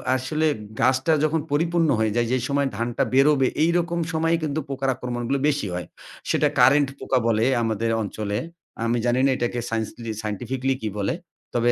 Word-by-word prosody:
আসলে 150 +5 0 0.3
গাছটা 130 +4 +3
যখন 155 +1 +2
পরিপূর্ণ 165 +1 +2
হয়ে 110 -1 +1
যায়। 120 0 +2
যেই 130 -2 +1
সময় 140 0 +1
ধানটা 115 0 0
বেরোবে 135 0 +4 0.2
এইরকম 170 +1 +1
সময়েই 165 +1 +1
কিন্তু 155 0 -1
পোকার 135 -1 -1
আক্রমণগুলো 125 +2 -2
বেশি 145 -8 0
হয়। 90 -1 -4 0.4
সেটা - - +3
কারেন্ট 140 +3 +5
পোকা 130 - 0
বলে 115 0 +2 0.2
আমাদের 115 0 -1
অঞ্চলে। 105 0 -3 0.5
আমি 115 +1 +1
জানি 120 +1 +2
না 140 - +4
এটাকে 120 0 -1
সায়েন্সলি 115 +1 -3
সায়েন্টিফিকলি 125 +5 -2
কি 110 - -2
বলে। 100 -1 0 0.4
তবে 120 0 +3
130 Hz, 165 wpm, -24 LUFS, 115-145 Hz, 0.5 s, কারেন্ট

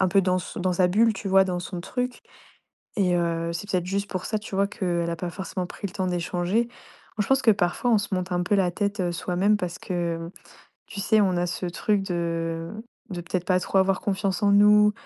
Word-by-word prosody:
un 190 - +4
peu 195 +1 +4
dans 185 -1 +1
s 180 - -7
dans 180 0 0
sa 180 0 +4
bulle, 220 +4 +4
tu 195 0 -5
vois, 190 0 +6
dans 180 -1 -2
son 180 -1 -6
truc. 250 +6 -3 0.8
Et, 185 -3 +2
heu, 170 -1 -1
c'est 200 +4 -5
peut-être 180 -1 0
juste 200 +2 -2
pour 185 -1 -3
ça, 215 - -1
tu 210 -2 -8
vois, 200 0 +3
qu'elle 175 -5 -2
a 170 - -2
pas 175 +1 -4
forcément 185 0 -4
pris 200 - -6
le 185 - -9
temps 190 -2 -2
d'échanger. 180 +5 0 0.5
Moi, - - +3
je - - -5
pense 270 0 +3
que 230 - +6
parfois, 195 +6 0
on 220 - +5
se 200 -1 -3
monte 185 0 -2
un 175 0 +1
peu 205 - +1
la 185 -3 +3
tête, 200 +2 -2
heu, 175 -1 0
soi-même 185 +4 +1
parce 180 -3 -4
que, 170 -2 -2
mmh, 165 +1 -7 0.6
tu 200 - -7
sais, 215 +1 +4
on 185 -3 +2
a 175 - +1
ce 180 +1 -3
truc 200 +3 0
de 165 -2 -2 0.4
de 175 -1 -4
peut-être 175 +1 -3
pas 185 -1 +3
trop 190 - -1
avoir 190 0 +2
confiance 195 -1 -1
en 200 - +5
nous 210 +1 +6
185 Hz, 245 wpm, -25 LUFS, 175-200 Hz, 0.8 s, vois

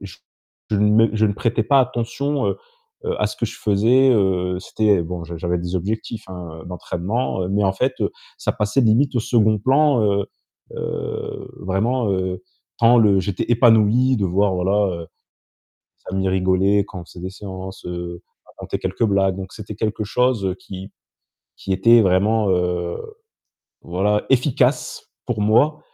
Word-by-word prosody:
je 95 -3 -10 0.5
je 105 - +1
ne 105 +2 +4
m 115 - +1
je 110 0 +3
ne 100 - 0
prêtais 115 +1 0
pas 135 +3 +4
attention, 130 +3 -1
heu-heu, - - -2 0.6
à - - +2
ce - - -6
que - - -2
je - - -9
faisais, 115 +6 +3
heu, 90 -3 +1
c'était 100 -1 +1
bon, 85 0 -6
j'avais 85 +1 -3
des 90 +1 -3
objectifs, 110 +3 -4
hein, 85 -3 -8
d'entraînement, 90 +3 -3
mais 100 +1 +1
en 95 - +2
fait 130 +6 0 0.5
ça - - -1
passait 105 +3 0
limite 120 +5 +3
au - - +2
second 110 -3 +2
plan. 135 +1 +3
Heu 100 -1 +1 0.5
heu, - - -5
vraiment, 110 +4 0
heu, 95 -1 -2 0.4
quand 115 +1 +5
le 100 -4 +4
j'étais 95 -1 -2
épanoui 120 +2 +4
de 100 - -1
voir, 95 +2 +1
voilà, 95 -1 0
heu, - - -10 1.1
amis 95 0 -1
rigolaient 95 +2 +2
quand 90 -3 -8
on - - -12
faisait 90 - -13
des 95 - -4
séances, 95 -2 -9
heu, 85 0 -6 0.3
on - - -23
racontait - - -5
quelques - - -1
blagues 95 -2 +1
donc 95 -1 -7
c'était 105 -1 -8
quelque 110 0 -2
chose 110 -5 0
qui 95 +1 -9 0.7
qui 95 - -4
était 115 +5 +5
vraiment, 100 +2 +2
heu, 90 -1 0 0.9
voilà 100 +4 0
efficace 135 0 +1 0.2
pour 110 -4 -2
moi. 145 +9 +3
100 Hz, 160 wpm, -21 LUFS, 95-115 Hz, 1.1 s, quand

